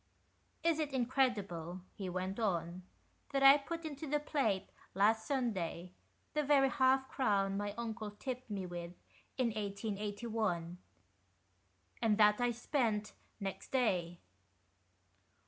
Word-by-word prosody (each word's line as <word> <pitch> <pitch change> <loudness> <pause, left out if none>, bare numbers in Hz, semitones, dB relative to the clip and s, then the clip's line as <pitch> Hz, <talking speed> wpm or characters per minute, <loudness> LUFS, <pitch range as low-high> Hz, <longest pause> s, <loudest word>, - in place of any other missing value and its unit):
" - - -40
Is 330 -1 +3
it 295 -3 -1
incredible," 210 - 0
he 195 -3 -5
went 185 +3 -3
on, 175 -4 -1 0.3
" - - -39
that 275 -1 +1
I 275 +2 +9
put 330 +3 -5
into 300 0 -5
the 295 +1 +1
plate 225 -10 0 0.2
last 220 +3 +3
Sunday 185 - -2 0.4
the 300 - +2
very 280 -2 +4
half 265 +1 +3
crown 200 -8 +1
my 205 0 -2
uncle 225 -2 -4
tipped 250 +4 -6
me 195 -3 -3
with 175 -1 -6 0.4
in 255 -3 +2
1881, 205 -3 -2 1.2
and 215 -2 +3
that 210 +1 +5
I 245 - +3
spent 230 -3 0 0.3
next 195 -2 -5
day 180 -9 +1
215 Hz, 130 wpm, -35 LUFS, 195-265 Hz, 1.2 s, I